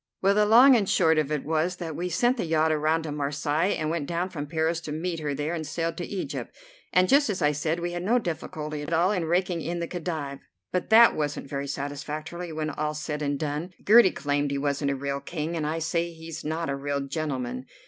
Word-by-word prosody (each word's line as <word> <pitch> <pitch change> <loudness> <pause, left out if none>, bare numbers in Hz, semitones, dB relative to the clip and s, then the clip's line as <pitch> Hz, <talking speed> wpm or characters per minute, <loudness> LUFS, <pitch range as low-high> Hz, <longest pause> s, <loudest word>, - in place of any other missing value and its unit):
Well, 195 +1 +3
the 210 0 +3
long 250 +5 +8
and 205 -5 +2
the - - -2
short 160 -3 +4
of 150 -1 -1
it 150 -2 -1
was 160 +3 0
that 165 -4 -5
we 180 +3 -2
sent 240 +9 +2
the 225 - -1
yacht 160 -1 +2
around 155 +1 +1
to 155 - -4
Marseilles, 145 +4 0
and 155 0 -1
went 160 -4 -2
down 175 +2 -1
from 145 -5 -5
Paris 160 +1 0
to 155 - -6
meet 165 +2 -3
her 145 -2 -2
there, 150 +4 -2
and 165 -2 -3
sailed 165 +2 -2
to 175 - -3
Egypt, 195 -2 -5 0.4
and, 185 0 +4
just 285 +1 +4
as 195 - -1
I 150 -3 +3
said, 155 +3 -1
we 175 0 -2
had 175 0 -4
no 220 +7 +2
difficulty 155 -6 -4
at 150 +3 -4
all 175 +4 +3
in 180 -5 0
raking 175 0 0
in 170 +3 -3
the 170 - -2
Khedive. 155 -6 -4 0.3
But 180 -1 -2
that 230 +1 +7
wasn't 145 -2 -2
very 140 0 -3
satisfactory 150 +5 -5
when 155 0 -3
all's 150 +1 -2
said 150 -1 -4
and 145 -1 0
done. 155 +4 -3
Gertie 220 -1 +8
claimed 145 -3 -1
he 140 - -1
wasn't 140 0 0
a 140 - 0
real 140 +1 -3
king, 155 +3 -4
and 155 -2 -1
I 160 +2 -1
say 170 +1 -1
he's 160 -1 -8
not 160 +2 -2
a 140 - -1
real 140 0 -2
gentleman. 145 - -3
160 Hz, 240 wpm, -26 LUFS, 150-175 Hz, 0.4 s, long